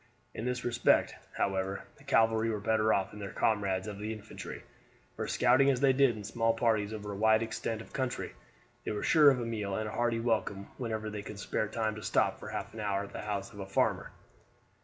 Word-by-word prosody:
In 110 - -5
this 125 0 -2
respect, 120 - +3 0.2
however, 95 0 -1
the 140 - -18
cavalry 115 -4 +3
were 110 -2 -1
better 110 +1 +2
off 95 -2 +1
than 105 - -10
their 100 -1 -5
comrades 100 -3 +1
of 105 -2 -6
the 105 +1 -3
infantry, 110 -1 -8 0.5
for - - -3
scouting 130 +3 +4
as 130 -3 +2
they 135 -1 +5
did 130 -4 +3
in 105 - -7
small 115 +2 +1
parties 110 -3 +1
over 105 -1 -5
a - - -5
wide 110 +2 +4
extent 110 0 -3
of - - -18
country, 130 - -2 0.5
they - - -3
were 105 - -3
sure 150 -3 +7
of 135 -2 +2
a 120 - -2
meal 105 -4 -2
and 110 +1 -2
a - - -5
hearty 120 0 0
welcome 110 -4 -1
whenever 110 -3 -3
they 105 -1 -4
could 105 0 -8
spare 105 +1 -1
time 110 0 -1
to 105 - -8
stop - - +1
for - - -8
half - - -5
an 110 - -8
hour 100 -1 0
at 100 - -10
the - - -5
house 105 -1 -4
of 100 - -11
a 95 - -5
farmer. 95 - +1
110 Hz, 225 wpm, -31 LUFS, 105-115 Hz, 0.5 s, sure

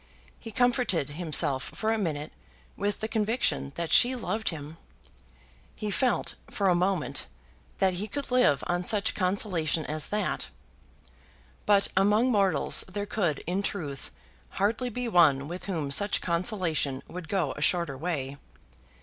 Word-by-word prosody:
He 225 - -9
comforted 235 - +1
himself 150 -4 0
for 220 0 0
a - - 0
minute 155 -5 -3 0.4
with 205 +1 -2
the 220 - -1
conviction 220 - 0
that 170 -1 -3
she 250 +2 +6
loved 220 -2 -1
him. 155 -1 -7 1.0
He 210 -2 -3
felt, 255 +3 +1 0.2
for 195 -2 +1
a - - +5
moment, 175 -6 0 0.5
that 190 -1 +2
he 195 +4 -3
could 280 +5 -5
live 250 - +3
on 175 0 -1
such 210 +1 +2
consolation 180 -5 0
as 155 0 -2
that! 210 0 -1 1.2
But 200 -1 +4
among 210 +6 +3
mortals 195 -8 +3
there 205 +2 -4
could, 180 -9 -1
in 180 +4 -1
truth, 150 -9 -4 0.5
hardly 225 +5 +1
be 245 +1 -4
one 155 -9 +4
with 175 +3 -6
whom 160 -8 -3
such 205 +9 +2
consolation 170 - 0
would 175 -2 -8
go 180 -9 0
a 150 - -7
shorter 170 -3 +1
way. 140 -3 -3
185 Hz, 145 wpm, -28 LUFS, 155-210 Hz, 1.2 s, she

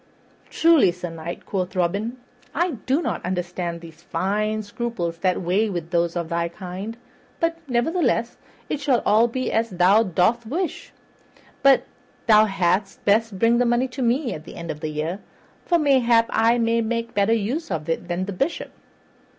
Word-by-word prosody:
"Truly, 325 - +4
Sir 180 -1 -7
Knight," 165 +1 -7
quoth 185 -2 -3
Robin, 200 +7 -1 0.4
"I 345 +4 +1 0.2
do 280 +6 +2
not - - -3
understand 180 -2 -3
those 165 -1 -13
fine 215 +4 -1
scruples 205 -6 -4
that 185 0 0
weigh 195 +6 +1
with 170 -3 -5
those 170 -1 +1
of 170 -2 -2
thy 170 0 -1
kind; 190 +5 -7 0.4
but, 330 0 0
nevertheless, 245 -1 0 0.3
it - - -2
shall 275 -4 +1
all 220 +3 +5
be 255 +2 -3
as 225 +1 +1
thou 185 +3 +4
dost 220 +4 +1
wish. 340 +8 -3 0.7
But 275 -1 +5 0.4
thou 215 -1 +6
hadst 195 0 -1
best 215 0 +2
bring 230 +4 +3
the 245 - +3
money 240 +2 +2
to 255 +2 -6
me 245 +2 +1
at 155 - -8
the - - -11
end 170 -1 -5
of 150 - -8
the 155 0 -3
year, 155 +5 -3 0.5
for 345 - +4
mayhap 250 -6 +4
I 230 +2 +3
may 230 0 +2
make 230 +1 -2
better 205 +2 +2
use 230 +9 -2
of 160 -4 -3
it 165 +2 -2
than 180 +1 -2
the 200 - -5
Bishop." 275 - -2
210 Hz, 175 wpm, -23 LUFS, 175-240 Hz, 0.7 s, thou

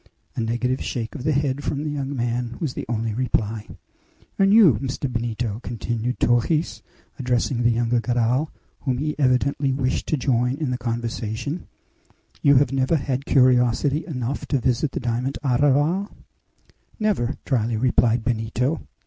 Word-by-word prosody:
A - - -1
negative 120 +3 -1
shake 115 -2 -4
of 140 - -7
the 155 - +3
head 140 -1 0
from 145 +1 -2
the 150 - -2
young 140 -1 -3
man 120 -1 -2
was 150 -6 -2
the - - -6
only 115 -1 -1
reply. 110 -3 -1 0.7
"And 195 0 +5
you, 195 - +6
Mr. 135 +1 -2
Benito," 115 -3 -3
continued 120 0 -3
Torres, 135 +7 +1 0.4
addressing 125 -1 0
the 120 - +4
younger 120 +1 +1
Garral, 125 +5 +1 0.3
whom 130 -3 -1
he 150 +3 -1
evidently 135 +1 +2
wished 130 -1 -1
to 155 - +1
join 125 -1 +1
in 145 -5 -2
the 125 - -1
conversation; 115 +5 -3 0.7
"you 140 0 +5
have 135 -1 +4
never 135 +4 +2
had 135 -2 -2
curiosity 130 +3 +3
enough 130 -4 -3
to 140 - +1
visit 130 +3 0
the - - -2
diamond 125 +2 -2
arraval?" 145 - +2 0.9
"Never," 185 - 0
dryly 115 -4 0
replied 120 -1 +2
Benito. 120 +5 -1
125 Hz, 150 wpm, -23 LUFS, 120-140 Hz, 0.9 s, you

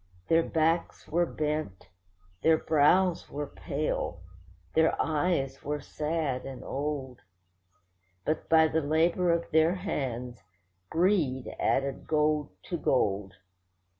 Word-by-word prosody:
Their 165 0 +5
backs 165 +1 0
were 170 +2 +1
bent, 150 - -3 0.5
their 160 0 +5
brows 165 +4 +3
were 145 +1 -4
pale, 140 - -3 0.5
their 160 0 +3
eyes 145 -4 0
were 150 +1 -3
sad 150 -3 -2
and 135 -2 -8
old; 135 -3 -4 1.1
But 155 - -2
by 160 -1 +6
the 160 +1 0
labour 170 +4 +2
of 170 0 -1
their 160 +3 +4
hands 125 - -4 0.5
greed 160 -7 +1
added 135 0 0
gold 150 -1 +1
to 175 - -3
gold. 100 -8 0
155 Hz, 110 wpm, -29 LUFS, 135-165 Hz, 1.1 s, by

